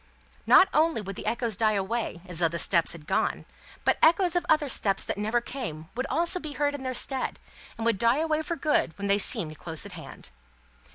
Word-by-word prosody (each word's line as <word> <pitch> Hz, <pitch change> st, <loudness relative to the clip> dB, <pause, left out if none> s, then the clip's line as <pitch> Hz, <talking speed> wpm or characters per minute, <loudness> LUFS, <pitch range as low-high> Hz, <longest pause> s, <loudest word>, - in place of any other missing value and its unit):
Not -, -, +7 dB
only 315 Hz, -2 st, +2 dB
would 195 Hz, -2 st, -6 dB
the -, -, -7 dB
echoes 235 Hz, -2 st, -1 dB
die 215 Hz, +2 st, +2 dB
away, 200 Hz, -2 st, -2 dB
as 180 Hz, -3 st, -4 dB
though 170 Hz, -, +3 dB
the 170 Hz, +1 st, -4 dB
steps 170 Hz, -1 st, +3 dB
had 160 Hz, -3 st, -12 dB
gone; -, -, -1 dB, 0.4 s
but, -, -, +2 dB
echoes 340 Hz, +2 st, +4 dB
of 350 Hz, -, +1 dB
other 305 Hz, -2 st, +3 dB
steps 195 Hz, -6 st, +1 dB
that -, -, -3 dB
never 215 Hz, +4 st, 0 dB
came 165 Hz, -, -7 dB
would 255 Hz, +3 st, -3 dB, 0.3 s
be 305 Hz, -2 st, -6 dB
heard 290 Hz, +2 st, 0 dB
in 285 Hz, -, -6 dB
their 255 Hz, -1 st, -3 dB
stead, 265 Hz, +1 st, -1 dB, 0.4 s
and 225 Hz, -, -4 dB
would 230 Hz, -4 st, +2 dB
die 235 Hz, +4 st, +3 dB
away 315 Hz, 0 st, 0 dB
for 335 Hz, +2 st, -3 dB
good 300 Hz, -, 0 dB
when 200 Hz, -, -5 dB
they 200 Hz, +1 st, +3 dB
seemed 155 Hz, -5 st, 0 dB
close 160 Hz, +1 st, -2 dB
at 205 Hz, -, -8 dB
hand. 165 Hz, -, -10 dB
230 Hz, 215 wpm, -27 LUFS, 185-290 Hz, 0.4 s, Not